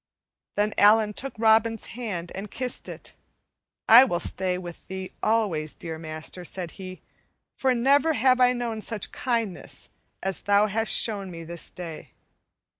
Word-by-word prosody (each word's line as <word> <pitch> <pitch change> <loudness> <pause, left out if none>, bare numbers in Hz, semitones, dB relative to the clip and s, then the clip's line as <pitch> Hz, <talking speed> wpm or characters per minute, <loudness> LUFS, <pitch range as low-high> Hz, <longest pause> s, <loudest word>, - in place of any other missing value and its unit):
Then 210 +1 +1
Allan 210 +1 +5
took 270 +5 -5
Robin's 225 0 +3
hand 200 -8 -5
and 200 +2 -6
kissed 250 +3 -3
it. - - -10 0.7
"I 235 +3 +10
will 175 -10 0
stay 185 0 -2
with 175 -2 -9
thee 190 0 -6
always, 195 -9 0
dear 160 -2 -6
master," 160 +3 -6
said 175 -1 -5
he, 185 0 -10 0.5
"for 260 -1 +1
never 280 +6 +3
have 255 -1 +3
I 250 0 +6
known 235 -3 -3
such 220 -1 -3
kindness 230 -7 -2 0.3
as 190 0 -1
thou 205 +1 +4
hast 220 +2 +1
shown 200 -4 +1
me 165 -2 -8
this 170 0 -4
day." 170 -3 -9
210 Hz, 150 wpm, -26 LUFS, 180-230 Hz, 0.7 s, I